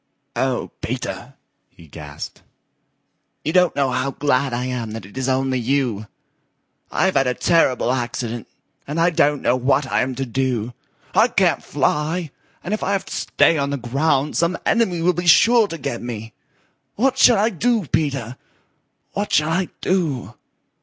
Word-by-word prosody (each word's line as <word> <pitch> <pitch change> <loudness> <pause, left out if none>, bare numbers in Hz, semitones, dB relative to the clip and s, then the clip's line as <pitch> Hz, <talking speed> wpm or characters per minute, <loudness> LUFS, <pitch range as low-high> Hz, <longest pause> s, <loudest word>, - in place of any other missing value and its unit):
"Oh, - - -1
Peter," - - -5 0.3
he 85 - -17
gasped, 75 -1 -9 1.0
"you 155 - -1
don't 180 -1 +4
know 135 -2 +1
how 130 +2 0
glad 140 -1 0
I 120 +1 -2
am 120 -4 -4
that 110 -3 -7
it 100 - -15
is 130 0 -2
only 130 0 +1
you. 120 -4 -1 0.8
I've 190 0 +2
had 135 -1 +2
a 125 - 0
terrible 135 -8 +2
accident, 120 -2 -3 0.4
and 150 +4 -3
I 170 +2 +4
don't 150 -3 +2
know 125 - +3
what 135 +3 +1
I - - 0
am 130 0 -2
to 135 +1 -3
do. 125 -2 -2 0.4
I - - +5
can't - - +2
fly, 155 +1 -1 0.3
and 185 - -3
if 215 - -2
I 200 - 0
have 195 - -1
to - - -8
stay 165 - +2
on 140 0 0
the 140 - -2
ground 135 +3 0
some 170 +1 +1
enemy 190 -8 +1
will 180 +1 +3
be 175 +1 -3
sure 225 +6 +6
to 165 - -6
get 120 -5 -4
me. 115 -2 -6 0.6
What 260 +4 +1
shall 240 - +7
I 215 +3 +2
do, 225 +1 +1
Peter? 135 -5 -2 0.7
What 205 +1 -3
shall 150 +1 +3
I 180 +2 0
do?" 165 -9 -1
140 Hz, 170 wpm, -21 LUFS, 125-170 Hz, 1.0 s, shall